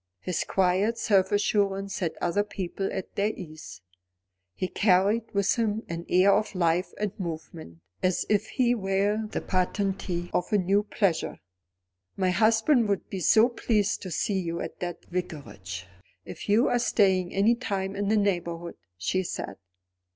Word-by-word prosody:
His 180 - -1
quiet 195 +4 +1
self 195 -4 +2
assurance 200 -1 +1
set 170 -4 -2
other 205 +4 +1
people 195 -1 -4
at 190 - -5
their 205 +1 +1
ease. 155 - -10 0.7
He 185 - -2
carried 205 +4 +2
with 200 -1 +2
him 220 -1 0
an 170 0 -5
air 190 +2 +5
of 210 -1 0
life 175 0 +1
and 210 -2 -1
movement, 160 - -7 0.2
as 185 -1 +1
if 210 0 +1
he 245 -2 +2
were 205 +1 0
the - - -3
patentee 185 -1 -1
of 180 - -1
a 210 - +4
new 195 +2 +2
pleasure. 200 -4 -1 0.8
"My 185 -2 +2
husband 225 +3 +3
would 200 - -2
be 195 - -3
so 220 +6 +5
pleased 220 -4 0
to 185 - -6
see 190 +4 0
you 170 -2 -3
at - - -6
the 175 -1 -4
Vicarage, 120 - -5 0.4
if - - -8
you 220 +5 +4
are 245 - +2
staying 190 -6 +2
any 200 +4 +3
time 200 -5 -3
in 200 0 -1
the 215 +1 +3
neighbourhood," 175 -4 -1 0.2
she 140 - 0
said. 130 - -5
195 Hz, 160 wpm, -27 LUFS, 175-210 Hz, 0.8 s, air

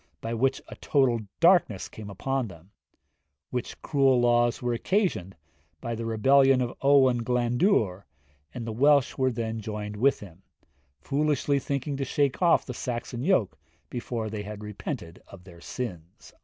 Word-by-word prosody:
by 115 - -4
which 135 +4 +1
a - - -9
total 130 -5 +2 0.2
darkness 170 - +3
came 105 -2 -10
upon 130 +6 -2
them; 90 0 -14 0.8
which 125 -1 -4
cruel 135 -4 +3
laws 120 0 +3
were 120 -1 -1
occasioned 120 - -1 0.4
by 115 - -4
the 115 0 -4
rebellion 135 +4 +4
of 125 -1 -2
Owen 130 -4 +4
Glandwr, 120 - +1 0.5
and 120 - -6
the 115 - -4
Welsh 140 +3 +4
which 130 -2 +1 0.2
joined 105 -1 -5
with 135 +6 +3
him; 95 -3 -13 0.6
foolishly 145 -1 0
thinking 140 +1 -3
to 135 - -2
shake 140 +2 0
off 175 -2 +4
the 125 - -6
Saxon 120 0 -4
yoke 135 - +1 0.3
before 120 -2 -4
they 105 -1 -5
had 105 0 -8
repented 90 -4 -6
of 95 -2 -13
their 85 -2 -15
sins.' 90 -8 -7
120 Hz, 150 wpm, -27 LUFS, 105-135 Hz, 0.8 s, rebellion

